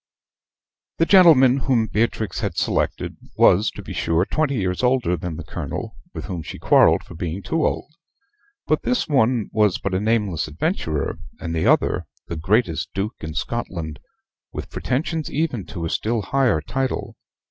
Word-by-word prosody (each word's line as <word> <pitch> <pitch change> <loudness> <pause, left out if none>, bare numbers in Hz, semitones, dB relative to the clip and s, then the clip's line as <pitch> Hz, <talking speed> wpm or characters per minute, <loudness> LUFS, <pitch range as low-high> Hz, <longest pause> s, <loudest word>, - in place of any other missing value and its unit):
The 165 - +3
gentleman 155 -9 +7
whom 130 -4 +2
Beatrix 110 0 -1
had 100 -6 -3
selected - - -1 0.2
was, 100 +5 +5
to - - -9
be - - -7
sure, 85 +2 +1
twenty 150 +1 0
years 95 -5 -1
older 125 -9 +2
than 85 -1 -5
the 85 - -6
Colonel, - - -5 0.2
with - - -7
whom 90 -3 -4
she - - -8
quarrelled - - +4
for - - -12
being 85 +3 -4
too 160 -1 0
old; 150 - -1 0.7
but - - +1
this 250 0 0
one 125 -5 +2
was 105 -4 +3
but 100 - -3
a 95 - +2
nameless 105 -7 0
adventurer, 75 - -2 0.2
and 85 0 -4
the 80 - +1
other - - +2 0.2
the 85 - -5
greatest 90 0 0
duke 100 +4 -2
in 80 0 -6
Scotland, 85 -5 -4 0.5
with - - -7
pretensions 155 +4 -2
even 140 - -2
to 85 -5 -5
a - - -2
still 110 -1 0
higher 120 - +2
title. 135 - -3
105 Hz, 165 wpm, -22 LUFS, 85-130 Hz, 0.7 s, gentleman